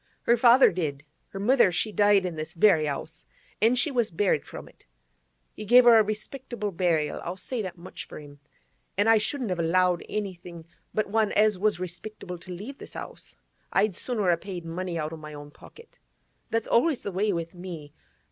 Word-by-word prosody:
'Her 235 - +4
father 240 +2 +6
did. 150 -5 -3 0.2
Her 195 - -8
mother, 235 -1 +4
she 175 +5 -1
died 205 -2 +4
in 175 -2 -3
this 155 +2 -6
very 165 -4 +4
'ouse, 155 +3 -5 0.4
an' 230 +3 +4
she 250 +5 +1
was 240 -4 +1
buried 170 -3 0
from - - -9
it. - - -21 0.7
He - - -8
gave 245 +4 +7
her 235 -2 +7
a - - +5
respectable 215 +1 -5
burial, 165 -4 0
I'll 175 +2 -5
say 235 +5 -3
that 185 -3 -6
much 175 +2 -9
for - - -10
him. 145 -1 -13 0.6
An' 205 +2 +2
I 225 -1 +6
shouldn't 245 -1 -2
have 180 - -2
allowed 180 +1 +2
anything 175 -5 -6 0.3
but 215 - 0
one 220 -1 +2
as 210 -2 +3
was 205 -2 +1
respectable 180 0 -7
to 180 - -10
leave 210 +10 -8
this - - -10
'ouse; - - -8 0.4
I'd 200 +1 +2
sooner 210 -2 0
a 170 - +2
paid 180 -3 -7
money 175 +1 -4
out 155 0 -3
o' - - -6
my 150 -1 -10
own 145 0 -10
pocket. 465 - -17 0.5
That's 225 -1 -1
always 275 +3 +2
the 200 - -4
way 200 +3 0
with 170 -1 -4
me. 170 -5 -9
190 Hz, 195 wpm, -26 LUFS, 170-215 Hz, 0.7 s, gave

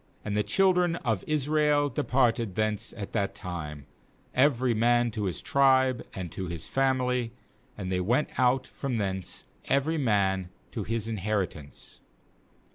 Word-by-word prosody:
24And 105 - -2
the 105 - +2
children 180 - +3
of 110 - -1
Israel 150 0 +2
departed 120 -5 +1
thence 110 -1 -1
at 100 -2 -6
that 100 -3 -1
time, 75 -7 -6 0.5
every 130 -2 +3
man 120 +1 +3
to 105 -1 -3
his 90 -5 -3
tribe 130 -2 +3
and 90 -4 -5
to 95 - -5
his 85 -2 -4
family, 125 -3 +1 0.4
and 95 -2 -4
they 90 - +1
went 120 +11 +1
out 130 +1 +3
from 135 -4 -4
thence 95 -3 -3 0.2
every 145 +4 +1
man 95 -7 +1 0.2
to - - -3
his 115 -1 -2
in 115 -1 -3
heritance. 95 -7 -4
115 Hz, 145 wpm, -28 LUFS, 95-130 Hz, 0.5 s, children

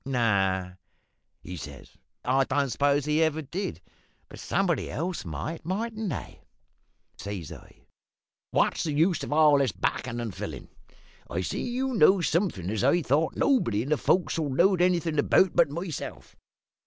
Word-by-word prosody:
"`No,' 95 -7 0 0.7
he 90 - -7
says, 70 -5 -10 0.3
`I 135 +1 +2
don't 140 -1 0
suppose 145 +1 +2
he 150 +1 +1
ever 160 -1 +1
did; 185 +8 -5 0.5
but - - -11
somebody 190 -4 0
else 175 +4 -3
might, 85 - -5
mightn't 215 +4 -3
they?' - - -6 0.8
"Says 100 -6 -6
I, - - -14 0.7
`What's - - +1
the 155 - -2
use 165 +2 +2
of - - -6
all 150 -1 +5
this 135 -5 +1
backin' 115 +6 -2
and 115 -4 -4
fillin'? - - -7 0.6
I 85 - -2
see - - -3
you 255 +2 -2
knows 190 -3 +4
somethin' 155 - -1
as 110 0 -1
I 160 +6 +3
thought 150 +5 +1
nobody 115 - +2
in 135 - -6
the 155 - +3
fo'c's'le 160 -3 +1
knowed 175 +7 +3
anything 170 -4 +1
about 185 +5 +3
but 170 - +4
myself. 165 +1 -6
150 Hz, 155 wpm, -27 LUFS, 120-175 Hz, 0.8 s, all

